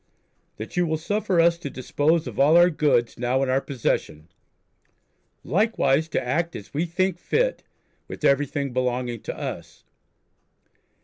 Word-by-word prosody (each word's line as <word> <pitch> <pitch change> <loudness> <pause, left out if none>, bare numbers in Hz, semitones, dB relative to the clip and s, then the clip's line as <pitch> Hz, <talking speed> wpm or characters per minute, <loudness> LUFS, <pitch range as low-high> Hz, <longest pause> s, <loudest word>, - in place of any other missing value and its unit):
That 110 - -8
you 175 -1 +2
will 160 0 0
suffer 190 +2 -1
us 170 0 +4
to 145 - -5
dispose 150 +5 0
of - - -7
all 150 +4 +6
our 175 +1 +6
goods 145 -8 +1
now 125 +2 +1
in 135 - -1
our 130 +1 +2
possesion. 80 - -3 1.1
Likewise, 160 -7 +1
to 130 - -2
act 165 +6 -1
as 100 - -10
we 160 +5 -1
think 185 +1 -1
fit - - 0 0.5
with - - -9
everything 140 -1 +1
belonging 125 -2 -2
to - - -6
us.... - - -7
150 Hz, 145 wpm, -24 LUFS, 130-170 Hz, 1.1 s, all